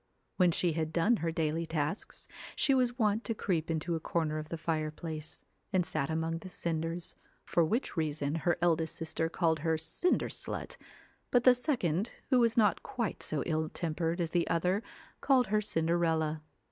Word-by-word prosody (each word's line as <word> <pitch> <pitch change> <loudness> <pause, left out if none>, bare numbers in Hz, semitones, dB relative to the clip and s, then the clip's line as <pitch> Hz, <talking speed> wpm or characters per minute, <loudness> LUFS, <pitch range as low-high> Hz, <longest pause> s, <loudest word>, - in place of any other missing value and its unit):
When 180 -2 +5
she 170 +1 +2
had 160 0 -2
done 175 +8 +3
her 165 -3 -1
daily 160 +1 -1
tasks, 160 +4 -3 0.3
she 275 - +3
was 250 -2 +2
wont 215 -1 +2
to 225 - -1
creep 170 -6 -1
into 165 +1 -1
a 165 - 0
corner 155 -1 -1
of 155 0 -7
the 165 - -3
fireplace, 155 -1 -4 0.3
and 185 -3 +2
sat 140 - -1
among 165 +1 -1
the 185 - -9
cinders, 165 0 -3 0.3
for 170 - +2
which 220 - -1
reason 150 -3 -1
her 165 +1 +1
eldest 160 -2 +2
sister 160 0 -2
called 165 -2 +1
her 160 +1 +1
Cinder 160 - 0
slut, - - -4 0.5
but 245 -2 +3
the 255 - +8
second 235 - 0 0.2
who 255 - +6
was 230 -1 +3
not 215 -2 +4
quite 235 -5 -3
so 150 -3 -1
ill 155 -1 0
tempered 165 +1 -2
as 165 -2 -1
the 175 -1 +1
other, 180 +5 +1 0.4
called 260 -3 +4
her 215 - +4
Cinderella. 160 -4 +1
165 Hz, 175 wpm, -31 LUFS, 160-190 Hz, 0.5 s, the